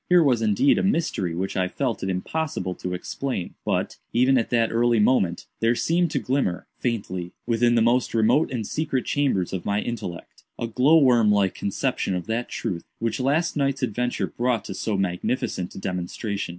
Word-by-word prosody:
Here 180 Hz, -1 st, +6 dB
was 125 Hz, -6 st, +3 dB
indeed 110 Hz, +5 st, +3 dB
a -, -, 0 dB
mystery 160 Hz, -, 0 dB
which 95 Hz, +3 st, -3 dB
I 90 Hz, -1 st, +1 dB
felt 125 Hz, +4 st, -2 dB
it 95 Hz, -, -2 dB
impossible 95 Hz, -, -2 dB
to 90 Hz, 0 st, -4 dB
explain; 95 Hz, 0 st, -4 dB
but, -, -, -1 dB, 0.2 s
even 130 Hz, +3 st, +4 dB
at 120 Hz, -, +1 dB
that 115 Hz, -2 st, +2 dB
early 120 Hz, 0 st, +3 dB
moment, 100 Hz, -6 st, +2 dB
there 115 Hz, +1 st, +2 dB
seemed 170 Hz, +6 st, +1 dB
to 150 Hz, -, -2 dB
glimmer, 130 Hz, -10 st, -1 dB
faintly, 95 Hz, -7 st, -3 dB
within 120 Hz, +1 st, +2 dB
the 115 Hz, -, +4 dB
most 120 Hz, +1 st, +2 dB
remote 115 Hz, +8 st, +3 dB
and 120 Hz, -4 st, -3 dB
secret 150 Hz, 0 st, -1 dB
chambers 135 Hz, -12 st, 0 dB
of 95 Hz, -, -3 dB
my 100 Hz, +1 st, 0 dB
intellect, 105 Hz, -7 st, -6 dB, 0.2 s
a -, -, -2 dB
glow 130 Hz, +8 st, +4 dB
worm 120 Hz, -7 st, +5 dB
like 100 Hz, -2 st, +2 dB
conception 95 Hz, -1 st, -1 dB
of 90 Hz, -, -3 dB
that 115 Hz, +2 st, -2 dB
truth 85 Hz, -3 st, -3 dB
which 115 Hz, +1 st, -2 dB
last 145 Hz, +6 st, +1 dB
night's 140 Hz, -2 st, 0 dB
adventure 125 Hz, +1 st, -1 dB
brought 120 Hz, -3 st, -1 dB
to -, -, -5 dB
so 105 Hz, +1 st, -2 dB
magnificent 90 Hz, 0 st, -2 dB
a -, -, -8 dB
demonstration. 95 Hz, +3 st, -3 dB
115 Hz, 185 wpm, -24 LUFS, 95-130 Hz, 0.2 s, Here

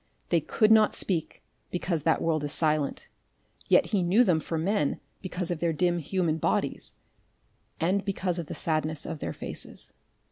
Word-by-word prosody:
They -, -, +3 dB
could 215 Hz, -1 st, +2 dB
not 220 Hz, -1 st, +5 dB
speak 170 Hz, -5 st, -2 dB, 0.3 s
because 175 Hz, -2 st, -1 dB
that 160 Hz, +2 st, +2 dB
world 155 Hz, -2 st, +1 dB
is 145 Hz, -, -3 dB
silent, 155 Hz, -2 st, 0 dB, 0.6 s
yet -, -, +5 dB
he 200 Hz, -, +3 dB
knew 185 Hz, +8 st, +4 dB
them 180 Hz, -8 st, +3 dB
for 165 Hz, +1 st, -3 dB
men 160 Hz, -3 st, 0 dB, 0.2 s
because 180 Hz, -1 st, -3 dB
of 170 Hz, -, -2 dB
their 170 Hz, -1 st, +1 dB
dim 175 Hz, +2 st, +1 dB
human 165 Hz, 0 st, 0 dB
bodies, -, -, -1 dB, 0.8 s
and 190 Hz, +4 st, +1 dB
because 185 Hz, -3 st, -1 dB
of 165 Hz, -, -5 dB
the -, -, -6 dB
sadness 155 Hz, -1 st, 0 dB
of 155 Hz, -, -5 dB
their -, -, -3 dB
faces. -, -, -6 dB
170 Hz, 170 wpm, -28 LUFS, 155-185 Hz, 0.8 s, not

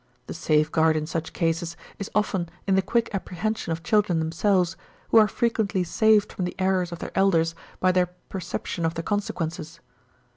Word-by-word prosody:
The -, -, -6 dB
safe 155 Hz, 0 st, +1 dB
guard 160 Hz, -1 st, +3 dB
in 155 Hz, -, -2 dB
such 160 Hz, 0 st, -4 dB
cases 165 Hz, 0 st, -1 dB, 0.2 s
is 200 Hz, -, -4 dB
often 190 Hz, -5 st, 0 dB, 0.2 s
in 195 Hz, -, +2 dB
the 190 Hz, -, +4 dB
quick 230 Hz, +4 st, 0 dB
apprehension 195 Hz, +1 st, -3 dB
of 165 Hz, 0 st, -3 dB
children 205 Hz, -2 st, +2 dB
themselves, 175 Hz, +3 st, +1 dB, 0.3 s
who 225 Hz, -, +7 dB
are 215 Hz, -, +6 dB
frequently 220 Hz, -5 st, 0 dB
saved 210 Hz, +3 st, +3 dB
from 180 Hz, -, -2 dB
the 180 Hz, -, -4 dB
errors 185 Hz, -2 st, +1 dB
of 170 Hz, -, -5 dB
their -, -, -6 dB
elders 165 Hz, -4 st, +3 dB, 0.3 s
by 185 Hz, -, +4 dB
their 180 Hz, -1 st, +2 dB
perception 180 Hz, -1 st, -5 dB
of 165 Hz, 0 st, 0 dB
the 165 Hz, -, -3 dB
consequences. 165 Hz, -5 st, -3 dB
180 Hz, 180 wpm, -25 LUFS, 165-200 Hz, 0.3 s, who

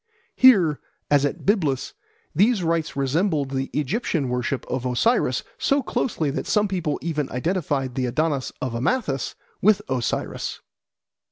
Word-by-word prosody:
Here, 190 Hz, -, +6 dB, 0.3 s
as 145 Hz, -1 st, +5 dB
at 145 Hz, -, -3 dB
Byblus, 155 Hz, -, +1 dB, 0.4 s
these 200 Hz, +4 st, +3 dB
rites 165 Hz, -1 st, 0 dB
resembled 140 Hz, +1 st, 0 dB
the 135 Hz, 0 st, -2 dB
Egyptian 150 Hz, -, -1 dB
worship 125 Hz, +2 st, -2 dB
of 125 Hz, 0 st, -3 dB
Osiris 130 Hz, -, +1 dB, 0.2 s
so 275 Hz, 0 st, +2 dB
closely 215 Hz, -, -1 dB
that -, -, -4 dB
some 210 Hz, 0 st, +2 dB
people 175 Hz, -6 st, -1 dB
even 150 Hz, -4 st, -2 dB
identified 140 Hz, -2 st, -1 dB
the 130 Hz, -1 st, -1 dB
Adonis 145 Hz, +1 st, 0 dB
of 130 Hz, -2 st, -2 dB
Amathus 135 Hz, -, -1 dB, 0.3 s
with 210 Hz, 0 st, +5 dB
Osiris. 130 Hz, -3 st, -2 dB
150 Hz, 135 wpm, -23 LUFS, 135-190 Hz, 0.4 s, Here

